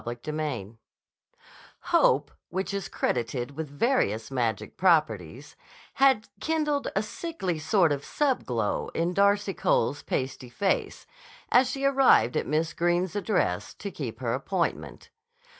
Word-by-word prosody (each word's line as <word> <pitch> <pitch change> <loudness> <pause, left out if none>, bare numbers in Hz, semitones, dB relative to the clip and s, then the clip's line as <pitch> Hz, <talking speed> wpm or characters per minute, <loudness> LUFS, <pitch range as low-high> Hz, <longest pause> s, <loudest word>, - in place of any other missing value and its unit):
CHAPTER 120 +6 -4
IV 115 -8 -4 1.0
HOPE, - - +3 0.2
which 190 +3 -3
is 200 -1 -3
credited 120 +2 -2
with 160 -1 -5
various 140 - 0
magic 115 -6 -2
properties, 145 - +1 0.4
had 265 -5 +3
kindled 300 -3 0
a 195 - +1
sickly 210 - -4
sort 160 +1 +3
of 140 -1 -2
sub 280 -4 0
glow 115 -4 -1
in 170 +2 0
Darcy 200 +1 +2
Cole's 145 -1 +1
pasty 130 -1 -3
face 190 +10 -1 0.5
as 250 +1 +5
she 275 +1 -2
arrived 265 - +4
at - - -1
Miss 155 +2 0
Greene's 175 +2 0
address, 185 - -1
to 200 - -6
keep 130 -7 -6
her 115 -2 -1
appointment. 170 +6 -3
160 Hz, 130 wpm, -27 LUFS, 125-205 Hz, 1.0 s, as